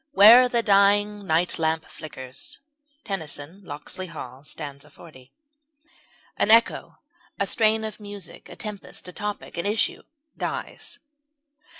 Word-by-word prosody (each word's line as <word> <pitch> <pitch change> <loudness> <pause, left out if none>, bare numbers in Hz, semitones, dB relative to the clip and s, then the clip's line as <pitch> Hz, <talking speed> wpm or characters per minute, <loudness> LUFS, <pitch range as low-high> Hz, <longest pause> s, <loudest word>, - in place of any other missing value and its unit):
Where 240 +3 +9
the 235 -1 +1
dying 205 0 +4
night 165 +2 +2
lamp 160 0 0
flickers. 130 -4 -8 0.5
TENNYSON 165 -2 -5
Locksley 175 +4 -6
Hall 135 -5 -9
st. 145 -1 -8
40. 130 -6 -15 1.1
An - - +1
echo, 230 +1 +4 0.4
a 200 - +2
strain 220 +1 +2
of 220 0 -5
music, 205 -3 -6
a - - -9
tempest, 210 -3 -6
a - - -10
topic, 205 -3 -5
an 170 - -1
issue, 210 +1 +1 0.3
dies. - - -4
195 Hz, 120 wpm, -25 LUFS, 155-210 Hz, 1.1 s, Where